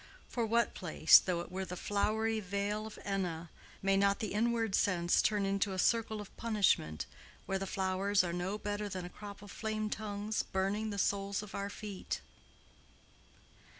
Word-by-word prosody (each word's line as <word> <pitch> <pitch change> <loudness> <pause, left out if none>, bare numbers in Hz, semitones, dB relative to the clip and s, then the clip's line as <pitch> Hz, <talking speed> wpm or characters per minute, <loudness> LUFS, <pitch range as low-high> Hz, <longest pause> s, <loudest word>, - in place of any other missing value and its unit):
For 235 -2 -1
what 235 +2 +2
place, 160 -3 +6
though 175 -2 -1
it 175 - -9
were 190 +1 -2
the 180 -1 -5
flowery 220 +3 +1
vale 205 +2 -2
of 220 - -10
Enna, 175 -5 -2 0.3
may 195 0 +4
not 200 0 +3
the 215 - -3
inward 225 -1 +1
sense 175 -3 +3
turn 210 -2 +2
into 195 0 +1
a - - -4
circle 220 +2 +2
of 205 - -9
punishment 200 - +1 0.4
where 195 0 -1
the 195 - -3
flowers 190 +1 +2
are 170 -1 -2
no 180 +4 -2
better 205 0 -3
than 185 -2 -4
a - - -6
crop 205 +1 -10
of 205 - -10
flame 215 -1 -2
tongues 210 0 -2
burning 200 +3 -1
the 200 - -4
soles 200 +1 0
of 210 - -10
our 200 0 -2
feet? 205 -2 -5
200 Hz, 175 wpm, -33 LUFS, 190-215 Hz, 0.4 s, place